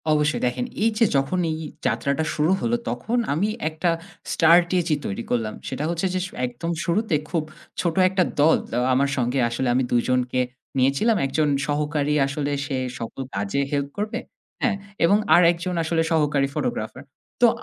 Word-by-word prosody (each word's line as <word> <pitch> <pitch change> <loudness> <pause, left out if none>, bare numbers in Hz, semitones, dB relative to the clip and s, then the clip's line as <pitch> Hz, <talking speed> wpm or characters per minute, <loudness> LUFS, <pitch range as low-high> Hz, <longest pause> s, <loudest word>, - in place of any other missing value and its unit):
অবশ্যই। 150 0 +2
দেখেন 125 - -2 0.2
এই 225 - +4
যে 230 - +5
যখন 135 +7 +1
এই 155 - -2 0.3
যাত্রাটা 140 +2 0
শুরু 155 +3 +2
হলো, 235 0 +1
তখন 240 +2 -2 0.2
আমি 190 +8 +1 0.2
একটা 160 +2 -1 0.4
স্টার্টেজি 170 0 +4
তৈরি 100 +4 -3
করলাম। 115 -3 0
সেটা 135 +2 -3
হচ্ছে 170 +2 -1
যে 185 - 0
স - - -12 0.2
একদম 125 +8 -4
শুরুতে 190 0 +1
খুব 165 -3 0 0.4
ছোট 170 -2 -1
একটা 190 0 +2 0.2
দল 160 +2 +6
অ্যা 120 - 0
আমার 140 +2 +2
সঙ্গে 125 +1 0
আসলে 120 +2 -2
আমি 130 - +2
দুজনকে 125 +1 +1 0.4
নিয়েছিলাম। 140 - +3
একজন 150 +3 +1 0.2
সহকারী 150 0 0
আসলে 145 0 -2
সে 135 -2 -2 0.2
সকল 115 +3 -6
কাজে 100 +8 -1
হেল্প 140 -1 -1
করবে, 210 +1 -2 0.4
হ্যাঁ 230 -4 +2 0.3
এবং 200 +5 +5 0.2
আরেকজন 175 +1 +3
আসলে 165 0 +1
সহকারী 150 -3 +2
ফটোগ্রাফার। 250 -1 -3 0.4
তো - - +7
150 Hz, 160 wpm, -23 LUFS, 135-175 Hz, 0.4 s, তো